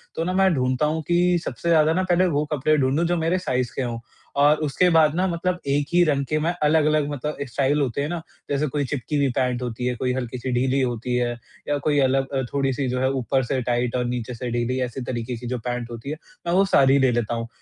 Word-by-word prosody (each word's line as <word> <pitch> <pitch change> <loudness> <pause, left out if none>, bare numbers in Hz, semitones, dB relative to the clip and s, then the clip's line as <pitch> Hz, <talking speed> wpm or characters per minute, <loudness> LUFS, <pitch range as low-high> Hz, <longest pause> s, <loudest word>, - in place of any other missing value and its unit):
तो 165 - -1
ना, 180 +2 -1
मैं 190 -1 +3
ढूँढता 130 0 +1
हूँ 155 +2 -1
कि 175 +1 +3
सबसे 170 - -3
ज़्यादा 160 -1 +4
ना 185 +2 +1
पहले 185 0 +2
वो 150 -3 0
कपड़े 150 +2 +2
ढूँढूँ 140 +4 +1
जो 175 +1 +1
मेरे 165 +2 +1
साइज़ 125 -8 -1
के - - -1
हो 120 -2 -3 0.4
और 145 +1 +5
उसके 180 +5 +2
बाद 160 -3 +4
ना 180 +2 +1
मतलब 180 +1 -1
एक 140 +1 +1
ही 175 0 +6
रंग 140 -4 +1
के 155 - +1
मैं 160 +3 +1
अलग-अलग 155 -1 +3
मतलब 150 +1 -4
स्टाइल 140 +4 +1
होते 135 0 -1
हैं 145 - -1
ना 175 -1 -3 0.3
जैसे 145 +1 0
कोई 145 +1 -1
चिपकी 145 +3 -3
हुई 140 -1 +2
पैंट 125 -1 0
होती 125 0 -4
है, 125 - +1
कोई 125 +2 -1
हल्की-सी 125 0 -4
ढीली 130 +2 +1
होती 125 -1 -1
है 120 -1 +1 0.4
या 145 - +1
कोई 145 -1 +2
अलग 135 0 +2
अ, 135 - +1
थोड़ी-सी 135 -1 0
जो 125 +1 -1
है 130 +1 +2
ऊपर 130 0 0
से 130 +1 -1
टाइट 120 0 -1
और 125 -1 0
नीचे 120 0 -3
से 120 +1 -5
ढीली 120 +2 -1
ऐसी 125 +2 -6
तरीके 120 0 -4
की 120 +1 -7
जो 125 +1 -2
पैंट 120 0 -4
होती 115 +3 -7
है 155 - -4 0.3
मैं 170 - +1
वो 195 +2 +4
सारी 135 -7 +4
ले 130 -2 +3
लेता 120 -1 -1
हूँ। 115 0 -4
135 Hz, 250 wpm, -23 LUFS, 125-155 Hz, 0.4 s, ही